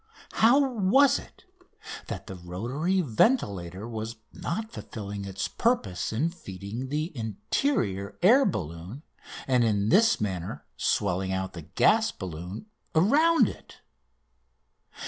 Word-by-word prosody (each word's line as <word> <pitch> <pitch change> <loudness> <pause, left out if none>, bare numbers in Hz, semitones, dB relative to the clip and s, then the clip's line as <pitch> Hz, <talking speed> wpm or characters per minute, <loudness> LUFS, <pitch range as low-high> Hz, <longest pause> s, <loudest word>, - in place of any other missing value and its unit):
How 235 +5 +5
was 255 +4 +4
it - - -16 0.6
that - - -5
the - - -7
rotary 120 - -2
ventilator 105 - +1
was 110 0 -5 0.2
not 220 +5 -4
fulfilling 100 -2 -6
its 95 0 -3
purpose 100 - 0
in 145 +10 0
feeding 110 - -7
the 155 +3 -2
interior 110 - -1
air 250 +9 +7
balloon 90 - -4 0.4
and 125 -2 +3
in 105 -2 +1
this 225 +6 +5
manner 95 -4 -4
swelling 95 +7 0
out 95 0 -2
the 85 - -7
gas 220 - +3
balloon 90 - -7 0.3
around 280 - +5
it? - - -10
115 Hz, 115 wpm, -27 LUFS, -, 0.6 s, air